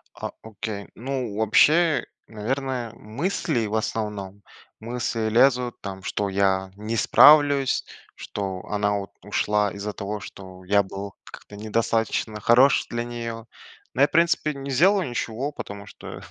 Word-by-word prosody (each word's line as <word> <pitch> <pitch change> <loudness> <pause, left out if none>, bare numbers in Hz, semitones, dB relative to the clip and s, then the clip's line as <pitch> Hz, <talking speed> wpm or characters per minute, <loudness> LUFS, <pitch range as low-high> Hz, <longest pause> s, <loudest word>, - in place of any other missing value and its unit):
А, - - -5
окей. 105 -1 -6
Ну, 125 -4 -4
вообще, 155 +9 +4 0.2
наверное, 125 +1 -3
мысли 120 - -2
в 105 - -4
основном, 105 -3 -3 0.4
мысли 115 -1 -2
лезут, 125 +1 +3
там, 95 -1 -7
что 100 -1 -1
я 95 -1 +1
не 110 +2 -3
справлюсь, 145 +1 +6 0.3
что 95 -2 -5
она, 105 0 0
вот, 100 0 -5
ушла 105 -1 +1
из-за 100 +1 -5
того, 100 +1 -5
что 95 -1 -11
я 100 +2 +3
был 100 0 -7
как-то 105 - -12
недостаточно 110 0 -1
хорош 125 +6 +5
для 120 0 -2
неё. 115 -1 -6 0.5
Но 135 - +1
я - - +8
в - - -27
принципе 165 -2 +2
не 140 0 -6
сделал 190 +8 +4
ничего, 125 +2 -3
потому 100 -6 -8
что, - - -10
110 Hz, 140 wpm, -24 LUFS, 100-130 Hz, 0.5 s, я